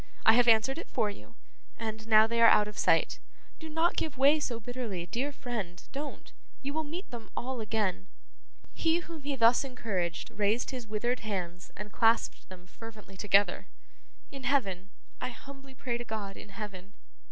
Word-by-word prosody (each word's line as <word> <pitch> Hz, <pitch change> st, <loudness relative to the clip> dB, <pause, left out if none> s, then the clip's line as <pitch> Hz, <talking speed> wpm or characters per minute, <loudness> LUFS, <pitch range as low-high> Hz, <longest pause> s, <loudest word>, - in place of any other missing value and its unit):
I 220 Hz, -, +9 dB
have 245 Hz, +1 st, +5 dB
answered 235 Hz, +6 st, +4 dB
it -, -, -7 dB
for 210 Hz, -, +1 dB
you 110 Hz, -, -14 dB, 0.4 s
and 220 Hz, -1 st, -5 dB
now 215 Hz, -1 st, +7 dB
they 230 Hz, +1 st, 0 dB
are 230 Hz, -, +9 dB
out 210 Hz, -, +5 dB
of 210 Hz, -, -8 dB
sight. -, -, +2 dB, 0.4 s
Do 320 Hz, -, -7 dB
not 325 Hz, +2 st, +2 dB
give 305 Hz, -5 st, -2 dB
way 285 Hz, +4 st, +6 dB
so 240 Hz, -6 st, -2 dB
bitterly, 230 Hz, -7 st, -4 dB
dear 250 Hz, -, -2 dB
friend, 215 Hz, -10 st, -5 dB
don't. 285 Hz, +1 st, -6 dB, 0.3 s
You 280 Hz, +1 st, -3 dB
will 315 Hz, +1 st, 0 dB
meet 330 Hz, +6 st, -6 dB
them 230 Hz, -3 st, -8 dB
all 255 Hz, -1 st, -2 dB
again.' 210 Hz, -3 st, -1 dB, 0.7 s
He 330 Hz, +1 st, +2 dB
whom 330 Hz, -3 st, -9 dB
he 285 Hz, 0 st, -2 dB
thus 235 Hz, +1 st, +5 dB
encouraged, 195 Hz, -10 st, -3 dB
raised 210 Hz, +5 st, +1 dB
his 250 Hz, -4 st, -6 dB
withered 240 Hz, +4 st, -1 dB
hands 180 Hz, -4 st, -4 dB
and 210 Hz, 0 st, -7 dB
clasped 230 Hz, 0 st, +2 dB
them 180 Hz, -1 st, -12 dB
fervently 210 Hz, 0 st, -11 dB
together. 200 Hz, +1 st, +3 dB, 0.6 s
'In 275 Hz, -1 st, -8 dB
heaven. 195 Hz, -9 st, +1 dB, 0.3 s
I -, -, -1 dB
humbly 270 Hz, +1 st, -12 dB
pray 240 Hz, -1 st, -3 dB
to -, -, -4 dB
God 215 Hz, -4 st, -5 dB
in -, -, -11 dB
heaven. 200 Hz, -1 st, -8 dB
225 Hz, 175 wpm, -30 LUFS, 205-265 Hz, 0.7 s, I